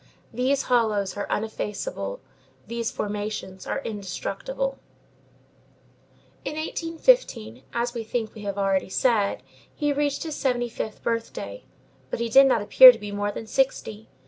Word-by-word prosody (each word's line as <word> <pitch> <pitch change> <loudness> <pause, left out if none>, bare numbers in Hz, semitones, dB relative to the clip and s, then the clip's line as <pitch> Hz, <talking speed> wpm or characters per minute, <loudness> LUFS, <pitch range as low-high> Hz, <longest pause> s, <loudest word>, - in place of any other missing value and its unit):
These 260 +4 +1
hollows 215 -6 +1
are 205 - -4
uneffaceable; 220 - -3 0.4
these 235 -1 -3
formations 205 -2 -5
are 275 - -2
indestructible. - - -4 1.6
In - - -4
1815, 325 - +1
as 240 +1 -1
we 235 -2 -4
think 220 0 -3
we 215 - -10
have 200 -1 -4
already 195 -1 +1
said, 215 -2 +1 0.3
he 295 -2 0
reached 285 0 -1
his 320 -2 -4
seventy 245 -2 0
fifth 220 -1 -6
birthday, 230 - -4 0.4
but - - -3
he 235 0 -1
did 270 +4 +7
not 230 -5 +2
appear 255 +5 +10
to 240 - -8
be 205 -2 -7
more 205 0 -1
than 225 - -7
sixty. 220 -3 -1
230 Hz, 140 wpm, -25 LUFS, 205-275 Hz, 1.6 s, appear